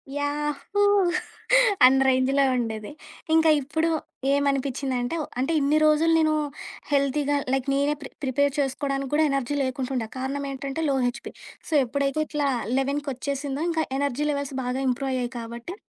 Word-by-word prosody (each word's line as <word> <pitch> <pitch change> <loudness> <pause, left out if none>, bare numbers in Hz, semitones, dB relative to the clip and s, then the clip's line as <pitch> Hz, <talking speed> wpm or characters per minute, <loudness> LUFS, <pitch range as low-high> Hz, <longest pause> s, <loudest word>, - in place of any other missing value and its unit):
Yahoo! 295 +7 -2 1.0
అన్ని 265 +1 +5
రేంజ్‌లో 265 +2 +3
ఉండేది. 220 -2 -3 0.4
ఇంకా 320 0 +5
ఇప్పుడు 320 +4 -1 0.4
ఏమనిపిచిందంటే 275 -1 -1 0.2
అంటే 270 +6 0
ఇన్ని 290 +2 +3
రోజులు 310 +2 +4
నేను 310 -1 +3 0.6
హెల్తీగా 285 +1 +1 0.2
లైక్ 270 0 0
నేనే 285 +2 +1
ప్రి - - -8
ప్రిపేర్ 280 +1 +1
చేసుకోవడానికి 275 0 -2
కూడా 310 +1 +4
ఎనర్జీ 275 +1 -1
లేకుంటూండె. 260 -2 -2
కారణం 275 +2 -3
ఏంటంటే 275 +3 -4
లో 275 - +2
హెచ్‌పి. 245 - -6 0.4
సో, 320 - -4
ఎప్పుడైతే 280 +4 -1
ఇట్లా 295 -2 -1 0.3
11 280 +2 0
కొచ్చేసిందో 275 +2 -3
ఇంకా 320 -1 0 0.2
ఎనర్జీ 285 +1 -1
లెవెల్స్ 280 -1 -3
బాగా 250 +2 -2
ఇంప్రూవ్ 265 +2 -1
అయ్యాయి 250 -1 -2
కాబట్టి 235 +9 -7
275 Hz, 135 wpm, -25 LUFS, 260-290 Hz, 1.0 s, అన్ని